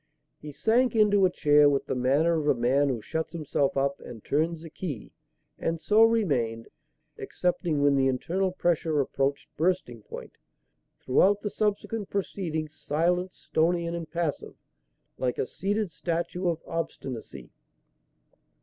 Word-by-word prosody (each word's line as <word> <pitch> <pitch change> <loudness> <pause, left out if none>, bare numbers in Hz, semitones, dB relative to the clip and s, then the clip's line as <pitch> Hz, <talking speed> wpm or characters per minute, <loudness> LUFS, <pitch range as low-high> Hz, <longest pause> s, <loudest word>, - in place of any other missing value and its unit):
He 150 - -8
sank 235 - +2
into 205 -3 +5
a - - -2
chair 150 -3 +5
with 140 -1 0
the - - -2
manner 140 +6 +2
of 150 - -3
a 130 - +2
man 135 +4 +3
who 120 -5 -2
shuts 160 0 -3
himself 140 -4 -1
up 140 +1 0
and 115 -3 -11
turns 160 +3 0
the 165 - -10
key; 155 - -6 0.5
and 165 0 -1
so 210 +6 +3
remained 140 - +2 0.5
excepting 170 -4 -1
when 145 -1 +4
the 135 -1 +3
internal 180 +9 0
pressure 165 -4 0
approached 140 0 -1
bursting 160 -9 0
point - - -10 0.6
throughout 200 +10 +3
the 205 - -3
subsequent 210 0 -2
proceedings, 160 -6 -3
silent, 175 +5 0
stony 170 +1 0
and 170 0 -3
impassive, 165 -2 -3 0.6
like 125 -1 -1
a - - 0
seated 200 +5 -2
statue 170 +4 -2
of 165 -2 -1
Obstinacy. 135 -7 -6
160 Hz, 140 wpm, -27 LUFS, 140-180 Hz, 0.6 s, into